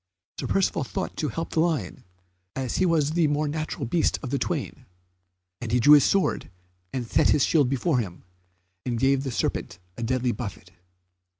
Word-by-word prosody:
Sir - - -3
Percivale 195 -7 +1
thought - - -4
to 155 - -1
help 165 +7 -4
the - - 0
lion, 155 - -1 0.5
as 130 -3 -2
he 185 - +3
was 155 -3 +2
the 165 -1 +2
more 150 +1 0
natural 155 -2 -3
beast 160 +8 +1
of 130 - -5
the 140 - 0
twain, 140 -5 -4 0.7
and 115 -2 -4
he 125 - +3
drew 145 +5 +7
his 145 -3 +8
sword 195 -1 +1 0.4
and 125 -2 -3
set - - +2
his 145 - +4
shield 145 -6 +3
before 135 +1 +1
him, 90 -6 -5 0.6
and 120 -2 -2
gave 135 +1 +3
the 135 - -3
serpent 115 - -2 0.2
a - - -6
deadly 125 +1 0
buffet. 100 -4 -7
135 Hz, 185 wpm, -25 LUFS, 120-155 Hz, 0.7 s, his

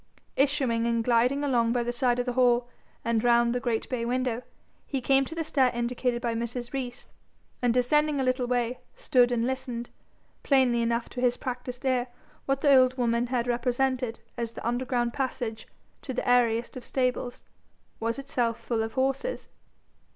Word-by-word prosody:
Issuing 265 -5 +1
and 230 -1 +1
gliding 250 +4 +2
along 235 -4 +2
by 245 -1 +1
the 240 - -1
side 245 0 +1
of 245 - -1
the 250 - -2
hall 245 -1 +3 0.4
and 230 -1 +1
round 235 0 +4
the 245 - 0
great 240 -3 -1
bay 250 -3 -2
window, 245 0 -1 0.5
he 275 - -2
came 270 +2 +3
to 320 - -8
the 330 - -1
stair 270 -4 +2
indicated 240 0 -1
by 235 -1 0
Mrs. 235 +2 -4
Rees, 250 -3 -4 0.6
and 245 -1 +3
descending 290 +4 +2
a - - +1
little 255 -1 0
way, 245 0 0 0.2
stood 245 -1 +3
and 235 -1 +1
listened: 250 -2 -4 0.5
plainly 255 -4 +3
enough 235 0 0
to 245 - -5
his 245 -1 +2
practised 250 0 -5
ear, 255 -1 +1 0.4
what 275 0 0
the 285 -2 +6
old 255 0 +4
woman 235 -1 +1
had 240 -1 0
represented 250 0 0 0.2
as 230 -1 -3
the - - -5
underground 240 -1 0
passage 245 -5 -3 0.3
to 260 - -5
the - - -2
airiest 240 -1 +2
of 255 - -7
stables, 250 -1 -2 0.6
was 230 +1 -1
itself 245 -4 -1
full 230 -2 -1
of 225 0 -3
horses. 270 - -1
245 Hz, 175 wpm, -27 LUFS, 235-260 Hz, 0.6 s, the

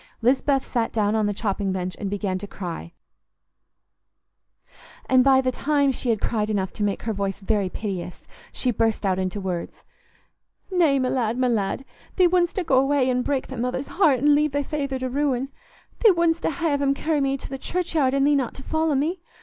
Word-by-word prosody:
Lisbeth 270 +2 +2
sat 235 -3 -1
down 210 -2 +1
on 215 -1 +1
the - - 0
chopping 200 -1 -2
bench 185 -1 -3
and 200 - -3
began 195 -2 -2
to 205 - -7
cry, 175 -4 -6 2.1
and 255 -1 +4
by 265 0 +5
the 255 -1 0
time 285 +1 +1
she 255 -1 -3
had 225 -2 +2
cried 215 -1 -1
enough 195 -3 -1
to - - -7
make 205 -1 -1
her 225 - -1
voice 195 -1 -3
very 200 -1 0
piteous, 180 -4 -5 0.3
she 255 - -1
burst 225 -1 0
out 190 -1 +1
into 185 +2 -2
words. 180 -3 -5 0.9
"Nay, 335 -7 +3
my 255 -1 0
lad, 235 -2 0
my 255 0 +2
lad, 225 +2 -1 0.3
thee 365 -2 +5
wouldstna 350 +1 +1
go 265 -4 +4
away 270 -1 +2
an' 250 0 +1
break 270 +1 -1
thy 265 - -8
mother's 250 +3 -2
heart, 315 -8 +3
an' 290 +4 +4
leave 300 -1 +2
thy 285 0 0
feyther 280 -2 -3
to 260 0 -3
ruin. 270 -1 -1 0.5
Thee 455 - +6
wouldstna 335 -1 +1
ha' 310 -4 0
'em 275 0 +2
carry 305 0 0
me 275 0 +1
to 270 - -7
th' 265 - -9
churchyard, 320 -7 0
an' 275 - +2
thee 290 +1 +4
not 265 -5 0
to 265 - -10
follow 315 -1 0
me. 325 +6 -1
260 Hz, 200 wpm, -24 LUFS, 210-285 Hz, 2.1 s, Thee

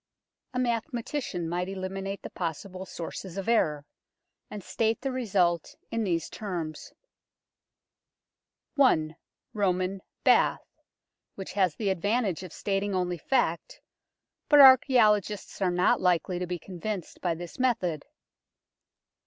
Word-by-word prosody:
A - - 0
mathematician 235 - -2
might 180 +2 -2
eliminate 195 +1 -5
the - - -7
possible 185 +3 -5
sources 175 +2 -7
of 195 - -4
error, 155 -11 +2 0.6
and 205 -2 -7
state 225 +3 0
the 270 0 -2
result 185 -9 0 0.2
in 230 -1 -1
these 170 -5 -1
terms 170 -7 -5 1.9
i 155 - +4 0.4
ROMAN 185 -1 0 0.2
BATH - - +3 0.7
which 190 -2 -7
has 185 -5 +2
the 205 -3 0
advantage 200 0 0
of 185 -3 -9
stating 195 +1 -2
only 180 -2 -1
fact, 170 - -1 0.7
but 295 - +7
archaeologists 225 -8 +5
are 190 - +3
not 180 +1 +2
likely 180 0 +1
to 180 - -3
be 180 0 -3
convinced 185 +2 -6
by 175 -2 0
this 175 +5 -9
method. 190 - 0
190 Hz, 120 wpm, -28 LUFS, 175-215 Hz, 1.9 s, but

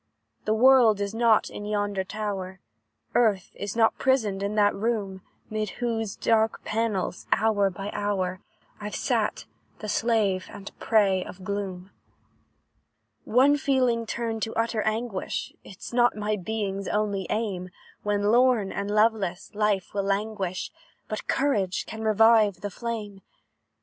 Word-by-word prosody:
"The 215 - +2
world 240 -3 +6
is 200 +1 -2
not 225 -1 +3
in - - -7
yonder 205 -2 -1
tower, 190 -2 -4 0.5
Earth 210 -6 +2
is 205 +1 -5
not 225 -1 +3
prisoned 220 -8 +1
in 200 +1 -2
that 205 -1 +4
room, 200 -3 -2 0.3
'Mid 215 -1 -2
whose 225 -4 -2
dark 220 -1 +1
panels, 215 -5 -2
hour 210 -3 +3
by 195 +3 -6
hour, 190 -2 -2 0.4
I've 210 0 -5
sat, - - -1 0.3
the 215 - -7
slave 210 -4 +1
and 200 - -9
prey 195 -4 +3
of 185 +1 -11
gloom. 195 -1 -4 1.3
"One 270 +5 +4
feeling 255 -6 +1
turned 225 -1 -3
to 225 - -3
utter 225 -1 0
anguish, 215 -2 -2
Is 195 - -10
not 240 -2 +3
my 210 0 0
being's 200 -1 -3
only 205 -3 -1
aim; 195 -5 -2 0.3
When, 205 -1 0
lorn 240 -4 +3
and 200 0 -3
loveless, 210 -3 +1
life 210 -3 0
will 200 - 0
languish, 195 -2 -2 0.4
But 215 - -5
courage 205 -10 0
can 220 - -7
revive 220 -3 +4
the 205 0 -4
flame. 210 -2 -5
210 Hz, 135 wpm, -26 LUFS, 195-225 Hz, 1.3 s, world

